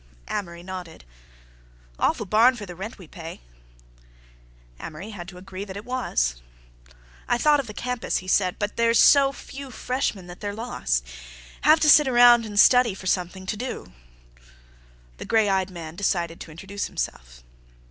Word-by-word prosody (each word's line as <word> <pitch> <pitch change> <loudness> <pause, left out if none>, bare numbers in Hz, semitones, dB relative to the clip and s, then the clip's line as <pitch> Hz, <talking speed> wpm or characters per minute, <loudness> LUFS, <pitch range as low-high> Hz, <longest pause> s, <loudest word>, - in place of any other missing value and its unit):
Amory 170 -4 -5
nodded. 180 - -8 0.9
"Awful 220 - +1
barn 225 +6 +4
for 215 -4 -7
the 180 - -9
rent 195 +8 -7
we 185 - -12
pay." 165 +1 -9 1.4
Amory 170 +8 -8
had 175 -4 -8
to 180 -1 -11
agree 185 +1 -8
that 195 -1 -8
it 205 - -8
was. - - -1 0.9
"I - - +2
thought 295 +4 +4
of 275 - -4
the 210 - -8
campus," 250 -1 -2
he 185 - -7
said, 185 -1 +2
"but 205 0 -2
they - - 0
say - - +3
there's 230 0 +4
so 275 -1 +6
few 275 0 -10
freshmen 250 -6 -3
that 175 0 -11
they're 205 -1 -4
lost. 210 - -2 0.6
Have 310 +3 +5
to 305 - +3
sit 300 -1 +7
around 240 -2 +6
and 205 -1 -1
study 245 -3 +6
for 195 - -11
something 185 0 -2
to 195 - -2
do." 245 - -6 1.2
The - - -8
gray 220 -2 +3
eyed 190 -1 +1
man 165 -3 -8
decided 170 -4 -1
to - - -9
introduce 195 +5 -5
himself. - - -6
200 Hz, 170 wpm, -24 LUFS, 180-240 Hz, 1.4 s, sit